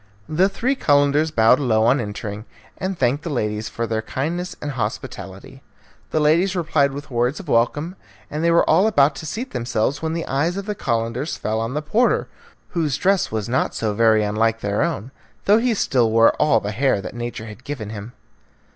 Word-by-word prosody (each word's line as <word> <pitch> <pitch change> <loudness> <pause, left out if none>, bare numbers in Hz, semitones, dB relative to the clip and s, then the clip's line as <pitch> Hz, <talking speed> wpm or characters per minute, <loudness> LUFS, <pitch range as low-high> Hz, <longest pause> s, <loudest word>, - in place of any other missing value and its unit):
The 180 +5 +2
three 255 +6 0
Calenders 145 - +3
bowed 115 -2 +4
low 110 -6 +2
on 130 +4 +4
entering, 105 0 -6 0.3
and 185 0 -3
thanked 135 +2 +1
the 170 - -4
ladies 105 -5 -2
for 115 - -3
their 110 -1 -1
kindness 165 +10 -3
and 150 - -4
hospitality. 125 -3 -6 0.5
The 155 - 0
ladies 170 +6 +3
replied 155 -5 +2
with 145 +1 -8
words 125 +4 0
of 195 - -10
welcome, 145 +8 +1 0.3
and 150 +2 -4
they 170 - +3
were 170 0 +4
all 185 +7 +4
about 145 -9 +4
to 155 - -7
seat 245 - -5
themselves 120 +3 -1
when 160 0 -2
the 165 0 -3
eyes 160 +7 0
of 200 - -4
the 210 - -2
Calenders 115 - -2
fell 110 +1 -2
on 115 +4 -3
the 150 - -2
porter, 220 +11 +2 0.4
whose 155 -6 -1
dress 195 +3 +1
was 110 -2 -2
not 125 +2 0
so 110 -2 -1
very 110 0 +4
unlike 110 +2 0
their 100 0 -1
own, 145 -7 -2 0.3
though 210 +3 +5
he 240 -1 +1
still 125 - +2
wore 115 +1 +5
all 125 -7 +3
the 105 -1 -4
hair 125 0 +1
that 100 - -7
nature 120 -2 -5
had 110 +3 -11
given 125 -8 -5
him. 110 +2 -8
135 Hz, 200 wpm, -21 LUFS, 115-160 Hz, 0.5 s, though